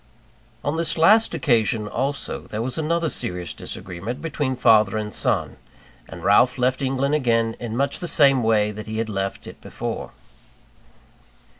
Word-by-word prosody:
On 145 +3 -1
this 165 0 0
last 215 +8 +5
occasion, 110 -6 +1
also, 135 +6 -2
there 110 +1 -4
was 125 +1 -2
another 165 +1 0
serious 90 - -2
disagreement 95 +7 -6
between 145 -5 -2
father 110 -4 +4
and 105 -1 -4
son; - - 0 0.5
and 85 0 -10
Ralph 105 +7 +4
left 130 +2 0
England 135 +1 0
again 115 -5 +1
in 115 -1 -5
much 140 +1 0
the 175 - -3
same 140 -5 +4
way 110 -2 +2
that 105 +1 -8
he 110 0 -4
had 110 0 -2
left 95 -1 -3
it - - -11
before. - - -5
120 Hz, 155 wpm, -22 LUFS, 105-140 Hz, 0.5 s, last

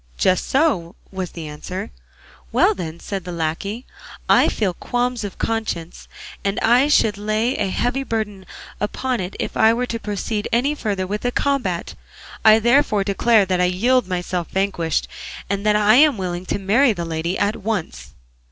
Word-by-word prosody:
"Just 185 -1 +2
so," 260 - +1 0.2
was 190 -2 -4
the 165 -2 -7
answer. 150 - -6 0.6
"Well - - +4
then," 170 -2 -6
said 195 -3 -5
the 180 - -6
lacquey, 170 +8 -3 0.4
"I - - +5
feel 195 -5 -1
qualms 245 +4 -2
of 205 - -6
conscience, 220 -7 -3 0.4
and 200 0 -1
I 245 +5 +4
should 215 -8 +3
lay 215 +4 0
a - - 0
heavy 245 +7 -1
burden 210 -7 -4 0.3
upon 250 +5 -2
it 185 +1 -5
if - - -3
I 225 +1 +5
were 250 +1 -1
to 230 -2 -4
proceed 210 0 -3
any 250 +6 +2
further 205 -9 -2
with 205 +3 -3
the 245 - -1
combat; 245 -12 -1 0.5
I 220 0 +8
therefore 235 -2 +3
declare 205 +2 +3
that 185 -1 0
I - - +4
yield 230 +6 +2
myself 180 -1 -2
vanquished, 190 -5 -1 0.4
and 200 0 -1
that 210 - +4
I 210 +2 +5
am 295 -3 +5
willing 180 -1 -4
to - - -1
marry 220 +6 +3
the 170 -3 -4
lady 165 +2 -2
at 205 +1 0
once." 170 - -4
205 Hz, 170 wpm, -21 LUFS, 180-230 Hz, 0.6 s, I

